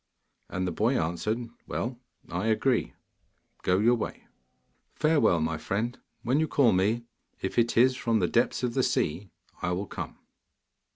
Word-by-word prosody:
And 95 0 -2
the 90 - -1
boy 115 +9 +1
answered, 105 +9 -1 0.2
'Well, 120 0 -3 0.3
I 90 +5 -2
agree; 115 +2 +1 0.7
go 90 - +2
your 115 +5 +4
way.' 120 - -4 0.7
'Farewell, 150 - +3
my 80 0 -1
friend. 115 +9 -2 0.2
When 130 +5 +2
you 160 - +2
call 135 -7 +4
me, 105 +6 +2 0.4
if 95 - -1
it 115 0 +1
is 130 +2 +6
from 115 -3 +1
the 90 -4 +2
depths 120 +5 +1
of 120 -1 0
the - - +2
sea, 95 +6 0 0.3
I 90 - 0
will 95 +3 -2
come. - - -6
110 Hz, 160 wpm, -28 LUFS, 90-120 Hz, 0.7 s, is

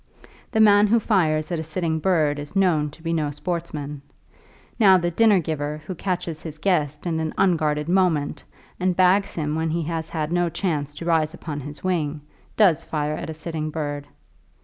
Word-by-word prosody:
The 220 - 0
man 205 -1 +6
who 230 +3 +4
fires 155 -8 +1
at 170 - -1
a - - -3
sitting 160 0 -2
bird 155 -5 +1
is 145 +5 -8
known 170 -6 +2
to 155 +3 -16
be 165 0 -1
no 155 -3 0
sportsman. 150 -2 -4 0.8
Now, 195 -4 +7
the 175 -1 -1
dinner 210 +1 +4
giver 150 -2 -3
who 185 - -4
catches 175 -3 -3
his 155 -2 -8
guest 150 -4 0
in 165 -2 -1
an 160 -1 -3
unguarded 155 -5 +1
moment, 170 -6 +1 0.4
and 185 -1 0
bags 190 +2 +3
him 150 -2 -2
when 160 +1 -1
he 165 +1 -1
has 160 0 -3
had 155 -1 -3
no 175 0 +1
chance 150 -5 -2
to 165 - -7
rise 160 -2 +1
upon 150 -3 -6
his 145 0 -9
wing, 155 -5 -1 0.4
does 175 -7 +4
fire 150 -1 -2
at 155 - -5
a 160 - -5
sitting 155 -1 -4
bird. 145 -2 -4
160 Hz, 190 wpm, -23 LUFS, 150-180 Hz, 0.8 s, Now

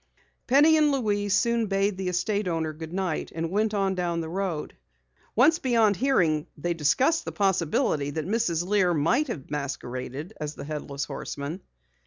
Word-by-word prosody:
Penny 295 +5 +6
and 300 -1 +4
Louise 205 -7 +1
soon 235 +2 +2
bade 195 0 +1
the 190 0 -4
estate 185 +3 0
owner 160 -2 -1
goodnight 165 +2 -3
and 165 0 -2
went 210 +2 +1
on 195 -1 +1
down 175 -2 -1
the 160 -1 -4
road. 180 -4 -3 0.6
Once 305 +8 +5
beyond 230 -5 +3
hearing 175 - +2
they 170 +4 -1
discussed 255 - +2
the - - -5
possibility 170 -7 +1
that 155 +1 -3
Mrs. 175 -5 0
Lear 185 -3 +2
might 235 - +2
have 160 - -6
masqueraded 140 +1 -5
as 150 0 -4
the - - -7
Headless 145 -2 -4
Horseman. 150 +6 -5
185 Hz, 160 wpm, -26 LUFS, 155-215 Hz, 0.6 s, Penny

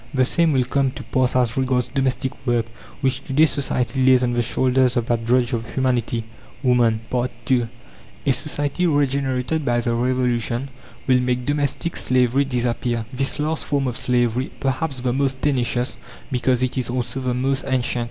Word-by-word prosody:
The 130 -1 +4
same 165 +4 +2
will 130 -3 +3
come 135 +2 +1
to 135 - -8
pass 125 +2 0
as 125 -3 +2
regards 130 -2 +1
domestic 135 -1 -1 0.2
work, 120 -1 +2 0.4
which 135 -1 0
to 135 - -5
day 155 +4 +6
society 130 -3 0
lays 130 -1 +5
on 120 -1 +1
the 120 - +1
shoulders 130 +1 +2
of 120 - +1
that 115 -1 -1
drudge 125 +1 +2
of 115 0 -4
humanity 120 -3 0 0.4
woman. 120 -3 +3 0.5
II 120 -2 +3 0.6
A - - +4
society 145 +5 -1
regenerated 140 0 0
by 120 -3 +1
the 120 0 -1
Revolution 125 +1 0 0.4
will 130 -1 +4
make 125 0 -1
domestic 145 +3 -1
slavery 130 +2 +2
disappear 120 -2 -1
this 135 +1 -1
last 155 +2 -1
form 140 -2 0
of 125 - -2
slavery, 120 +1 0
perhaps 135 0 -2
the 125 -1 0
most 135 0 0
tenacious, 125 -3 0 0.3
because 125 0 +1
it 130 +1 -1
is 125 - -3
also 125 +1 -2
the 125 -1 -1
most 135 +2 0
ancient. 125 -2 0
130 Hz, 170 wpm, -22 LUFS, 120-135 Hz, 0.6 s, day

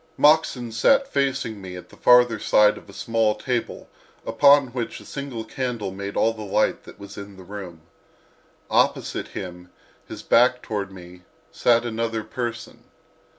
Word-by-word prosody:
Moxon 145 -6 +3
sat 270 - +3
facing 135 - -1
me 90 -1 -8
at 90 0 -11
the - - -16
farther 125 -2 +5
side 105 0 +4
of - - -14
a - - -10
small 110 +1 0
table 120 +1 -3 0.4
upon 140 -2 +5
which 120 -1 -5
a - - -14
single 140 -5 -6
candle 120 -5 -4
made 100 +1 -6
all 115 - +3
the 110 - -10
light 105 +1 0
that - - -14
was 100 0 -10
in 100 -1 -10
the 95 - -12
room. 90 -4 -9 0.9
Opposite - - +1
him, 90 -1 -8 0.4
his - - -9
back 125 +1 +3
toward 100 -3 -4
me, 90 -1 -13 0.3
sat 120 0 +2
another 115 -1 -2
person. 120 +1 -6
115 Hz, 155 wpm, -23 LUFS, 100-125 Hz, 0.9 s, farther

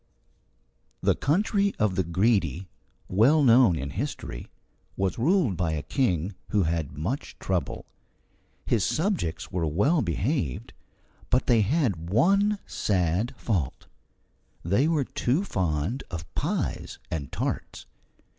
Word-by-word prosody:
The - - +4
country 200 +6 +1
of 105 -3 +1
the 95 - +1
Greedy, 90 - +1 0.4
well 130 +11 +4
known 120 -8 +6
in 70 0 -4
history, 100 - -5 0.5
was 95 +2 -1
ruled 155 - +2
by 85 -3 0
a 75 -2 -3
king 100 - 0 0.2
who 105 -2 +2
had 80 -3 -2
much 115 - -4
trouble. 90 -6 -2 0.8
His 110 -5 +1
subjects 160 - -1
were 85 -3 -1
well 120 - +2
behaved, 90 - -2 0.6
but 125 - +2
they 115 -3 +4
had 105 - 0
one 200 - +3
sad 95 +3 0
fault: 90 - -2 0.8
they 100 - +3
were 155 -4 +1
too 135 +11 0
fond 90 - -1
of 80 -3 -5
pies - - -2
and 70 -5 -4
tarts. - - -4
100 Hz, 120 wpm, -26 LUFS, 85-135 Hz, 0.8 s, known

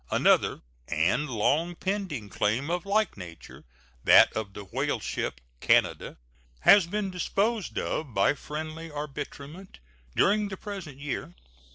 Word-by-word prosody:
Another - - +3 0.2
and 95 - +1
long 150 +10 +1
pending 185 - -3
claim 120 - 0
of 180 +2 -2
like 215 - +1
nature, 85 -3 -11 0.4
that - - +7
of 105 -3 -4
the 105 - -7
whaleship 85 -7 -2 0.2
Canada, - - +2 0.4
has 190 - +7
been 200 +1 -2
disposed 200 +4 -1
of 155 -5 -2
by 100 +5 +3
friendly 155 +3 -6
arbitrament 150 +4 -7 0.4
during 210 +1 +3
the 190 -1 -6
present 190 -9 -7
year. 135 -11 -5
155 Hz, 125 wpm, -27 LUFS, 125-195 Hz, 0.4 s, that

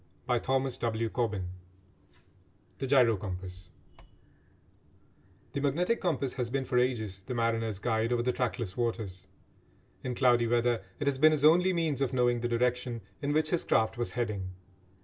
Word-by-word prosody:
CHAPTER 130 +2 +2
VII 120 -4 -1 1.7
THE 135 - -2
GYRO 125 -5 +5
COMPASS 90 -2 -6 1.8
The 140 - -1
magnetic 175 - +1
compass 155 -7 0
has 125 -2 -2
been 135 +1 -1
for 125 - +2
ages 110 -6 -1
the 125 +6 -5
mariner's 115 -2 0
guide 110 +2 0
over 120 -1 +1
the 125 - +2
trackless 115 -6 -2
waters. 110 -6 -3 0.8
In 125 -1 -3
cloudy 120 -2 +4
weather 120 -2 +1 0.2
it 145 - -2
has 140 -2 +1
been 155 +2 +6
his 150 -1 +2
only 180 +4 +6
means 160 -6 0
of 135 -1 0
knowing 120 -1 +2
the 120 - -1
direction 120 0 0 0.2
in 145 0 -1
which 155 +1 +1
his 175 - +1
craft 110 0 +2
was 120 0 -3
heading. 100 -6 -3
120 Hz, 150 wpm, -30 LUFS, 115-135 Hz, 1.8 s, been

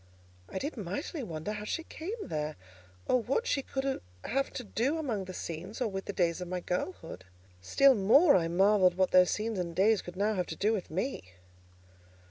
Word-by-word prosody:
I - - -5
did 285 +7 -4
mightily 220 - -4
wonder 165 -3 -4
how 210 0 -5
she 330 +10 -3
came 365 +8 -6
there, 155 -1 -3 0.5
or 255 - +2
what 270 - 0
she 280 - +1
could 270 0 -2 0.3
have 275 +5 0
to 250 - -5
do 245 +8 0
among 235 -11 -2
the 185 - -7
scenes, 175 +6 -6
or 250 - +1
with 195 -1 -5
the - - -3
days 175 -3 0
of 180 - -4
my 180 +1 -2
girlhood. 180 - -4 0.4
Still 270 - +5
more 250 - +6
I 170 -3 +2
marvelled 185 +1 +4
what 185 0 +2
those 180 -1 +6
scenes 215 -1 -2
and 170 -2 -3
days 205 +2 +4
could 175 - -9
now 205 +3 +1
have 180 -3 -1
to - - -5
do 215 +2 +1
with 200 -5 -3
me. 160 - -4
200 Hz, 200 wpm, -30 LUFS, 180-255 Hz, 0.5 s, more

